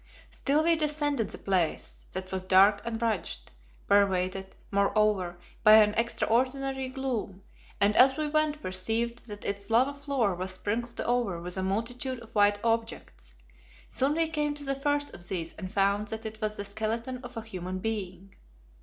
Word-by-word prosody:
Still 290 +3 +1
we 335 0 +4
descended 295 -6 0
the - - -7
place, 185 -5 -2
that 185 0 -5
was 190 -1 -3
dark 195 +2 +5
and 230 -1 -3
rugged; 220 - -1 0.5
pervaded, 190 -1 +1 0.2
moreover, 200 -3 +1 0.2
by 215 -1 +7
an 210 -1 +7
extraordinary 260 +4 0
gloom, 245 -8 -4 0.4
and 205 +1 +3
as 265 +1 +6
we 305 -1 -1
went 300 0 0
perceived 225 +6 -2
that 205 -2 -8
its 200 +1 -4
lava 250 +5 +3
floor 280 -8 0
was 185 +1 -3
sprinkled 235 +5 -3
over 235 -8 0
with 180 +1 -3
a 190 - -2
multitude 235 +7 -2
of 230 -1 -14
white 205 -1 +4
objects. 225 - -3 0.5
Soon 275 +3 +1
we 330 0 +2
came 295 -2 -1
to 290 - -4
the 275 -1 +1
first 290 +1 -1
of 175 - -8
these 165 -3 -3
and 185 -2 -7
found 200 +1 +1
that 220 +1 -5
it 220 0 -7
was 215 0 -1
the 205 - -5
skeleton 225 +5 -3
of 245 -1 -9
a 225 - -4
human 185 -4 -5
being. 195 -2 -4
220 Hz, 170 wpm, -28 LUFS, 195-260 Hz, 0.5 s, by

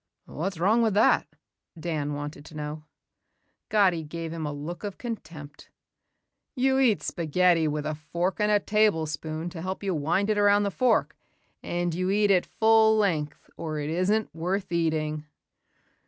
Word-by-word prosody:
"What's 185 +4 -4
wrong 210 +8 +3
with 220 -3 +1
that?" 215 - +4 0.5
Dan 150 -3 -2
wanted 145 0 -6
to 155 - -13
know. 150 0 -6 0.8
Gatti 190 -6 +3
gave 165 +1 -6
him 160 -2 -4
a - - -3
look 150 +6 -6
of 200 -2 -5
contempt. 160 - -8 0.9
"You 265 +1 +2
eat 220 - +3
spaghetti 170 0 +2
with 150 0 -2
a 155 - -1
fork 170 +6 -3
and 210 0 +2
a 205 - +4
tablespoon 160 -6 0
to 165 -2 -7
help 190 +3 -4
you 195 -2 0
wind 170 +7 +1
it 210 - +1
around 205 0 +4
the 200 - -1
fork 245 +3 +1 0.5
and 175 -1 -2
you 185 +2 -1
eat 205 +1 +3
it 185 -2 +3
full 220 0 +4
length 160 -8 -1
or 155 -2 -4
it 150 +1 -3
isn't 200 +6 0
worth 185 +4 -2
eating." 155 -2 -1
175 Hz, 160 wpm, -26 LUFS, 155-205 Hz, 0.9 s, that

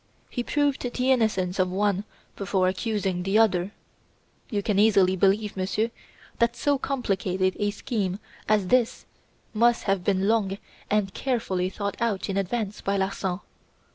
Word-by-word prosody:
He 245 - -2
proved 290 +2 0
the 250 +1 0
innocence 200 -7 +1
of 185 0 +3
one 200 +1 0 0.3
before 195 -2 +1
accusing 190 -2 -1
the 195 +3 +1
other. 195 -4 +3 0.8
You 205 -4 -1
can 200 -1 +1
easily 195 -3 +5
believe, 200 +3 +2
Monsieur, 195 +4 -1 0.5
that 235 0 +2
so 285 +3 +1
complicated 190 -8 0
a 205 - +1
scheme 200 -3 -2 0.3
as 205 -4 +2
this 250 -2 +2 0.5
must 235 +2 +3
have 195 -3 0
been 195 0 +1
long 205 -3 +1 0.3
and 205 -2 +1
carefully 205 -8 -1
thought 200 +1 -4
out 210 -4 0
in 195 - -1
advance 200 +2 -2
by 200 0 0
Larsan. 190 -1 -2
200 Hz, 145 wpm, -26 LUFS, 190-225 Hz, 0.8 s, easily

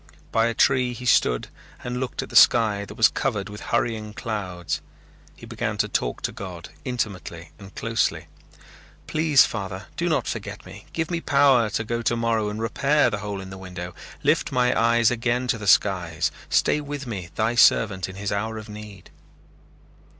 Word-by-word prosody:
By 115 0 +3
a 115 - -2
tree 125 -1 +3
he 125 +1 -8
stood - - +2 0.3
and 125 0 -3
looked 130 -1 -3
at - - -11
the - - -9
sky 105 -4 +5
that - - -11
was 110 - +6
covered 105 -7 -2
with 105 +1 -9
hurrying 110 -2 -2
clouds. 90 -7 -4 0.5
He - - -12
began - - -3
to - - +1
talk - - -2
to - - -1
God 90 -3 -8
intimately 100 -9 -4
and 100 -1 -13
closely. 115 -1 -1 0.8
"Please, 155 -3 +4
Father, 95 -3 -5
do - - 0
not - - +1
forget - - -5
me. 95 +2 -12
Give 160 +1 -2
me 170 -1 -1
power 135 -7 +4
to 110 - -2
go 115 +1 -2
tomorrow 115 -2 0
and 105 +1 -5
repair 135 +4 +2
the 105 - -2
hole 100 -1 -4
in 95 0 -8
the 95 - -8
window. 90 -2 -7 0.3
Lift - - +2
my 125 -1 +2
eyes 115 0 +3
again 120 +1 0
to 115 - +1
the 105 - -6
skies. 90 -5 +2 0.2
Stay 150 - +2
with 145 -1 -6
me, 95 -7 -5
Thy 110 +2 +1
servant, 100 -6 +4
in 95 - -9
his 100 +1 -3
hour 110 +2 -2
of 110 0 -8
need." 105 -4 -11
110 Hz, 180 wpm, -24 LUFS, 100-120 Hz, 0.8 s, was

